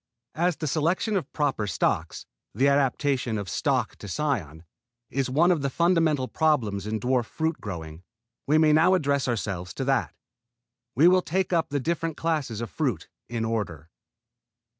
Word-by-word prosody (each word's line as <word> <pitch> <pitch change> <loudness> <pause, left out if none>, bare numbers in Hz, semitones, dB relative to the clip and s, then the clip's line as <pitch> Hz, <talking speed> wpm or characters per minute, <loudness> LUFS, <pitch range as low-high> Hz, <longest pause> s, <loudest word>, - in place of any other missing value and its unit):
As 175 +1 +1
the 155 - -5
selection 165 - 0
of 190 - -2
proper 140 -8 -1
stocks 80 - -1 0.3
the 135 +6 +3
adaptation 135 -3 +1
of 100 -2 -4
stock 80 - -1
to - - -9
cion 95 - -2 0.5
is 135 0 -1
one 165 +7 +4
of 165 -5 +1
the 140 - 0
fundamental 165 -4 +2
problems 115 - 0
in 110 0 -2
dwarf 125 +1 +1
fruit 160 0 -2
growing, 80 -6 -7 0.5
we 150 +2 +4
may 155 -1 +5
now 165 +5 +5
address 140 -6 0
ourselves 100 -6 -3
to 135 - -3
that. 135 -2 0 0.8
We 150 +7 +6
will 185 +1 +5
take 185 +1 -1
up 165 -2 +1
the 145 0 -1
different 165 +2 -2
classes 150 -9 -1
of 115 - -5
fruit 125 - -2 0.2
in 115 -1 -2
order. 85 -8 -3
140 Hz, 160 wpm, -26 LUFS, 110-160 Hz, 0.8 s, We